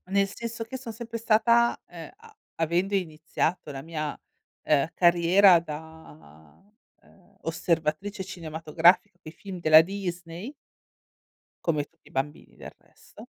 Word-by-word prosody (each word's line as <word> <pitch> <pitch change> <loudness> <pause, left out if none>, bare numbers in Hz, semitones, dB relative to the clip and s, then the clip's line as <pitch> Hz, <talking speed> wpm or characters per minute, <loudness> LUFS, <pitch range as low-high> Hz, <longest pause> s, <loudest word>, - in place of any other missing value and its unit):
Nel 195 +1 +2
senso 230 +2 -6
che 230 +4 -7
son 245 -3 -7
sempre 230 +1 -6
stata, 235 +1 +3
ehm, 170 -2 -10
a 445 0 -18 0.2
avendo 175 +5 0
iniziato 160 -2 -2
la 135 -1 -7
mia, 155 -1 -5 0.5
uhm, 145 -1 +2
carriera 175 +2 +6
da, 150 - -12 0.4
uhm, 195 +1 -25
osservatrice 165 +4 -1
cinematografica 165 0 +1
coi 155 - -11
film 190 +1 -9
della 155 -2 +7
Disney 175 - -6 1.1
come 150 -4 +1
tutti - - -24
i - - -24
bambini 135 +3 -5
del - - -10
resto, - - -20
175 Hz, 125 wpm, -26 LUFS, 155-200 Hz, 1.1 s, della